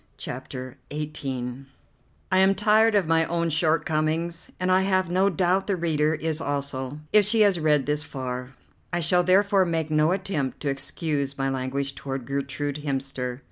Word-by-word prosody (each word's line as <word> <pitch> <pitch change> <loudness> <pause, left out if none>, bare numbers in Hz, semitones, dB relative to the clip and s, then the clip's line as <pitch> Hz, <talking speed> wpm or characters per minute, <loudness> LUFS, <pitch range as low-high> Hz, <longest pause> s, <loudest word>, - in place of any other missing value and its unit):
CHAPTER 130 +1 -7
XVIII 135 -4 -4 0.7
I 185 - +4
am 190 +1 +5
tired 215 +2 +4
of 200 -3 +3
my 165 +1 +3
own 170 0 -1
shortcomings, 160 +2 0
and 185 0 +1
I 185 +1 +5
have 185 -2 +1
no 190 +2 +3
doubt 185 +2 +1
the 200 - +1
reader 155 -3 +1
is 160 0 -3
also, 140 -1 -3
if 210 -1 +7
she 220 +1 +3
has 200 -4 +4
read 150 -3 +2
this 150 +1 0
far. 130 -3 -6 0.4
I 175 - 0
shall 180 +2 +3
therefore 195 +2 +4
make 165 -3 -1
no 155 +2 +3
attempt 180 -8 -2
to 145 - -1
excuse 140 0 -2
my 135 0 0
language 135 +1 -2
toward 135 -2 -5
Gertrude 140 +1 -3
Hemster. 135 -3 -3
155 Hz, 165 wpm, -25 LUFS, 135-180 Hz, 0.7 s, if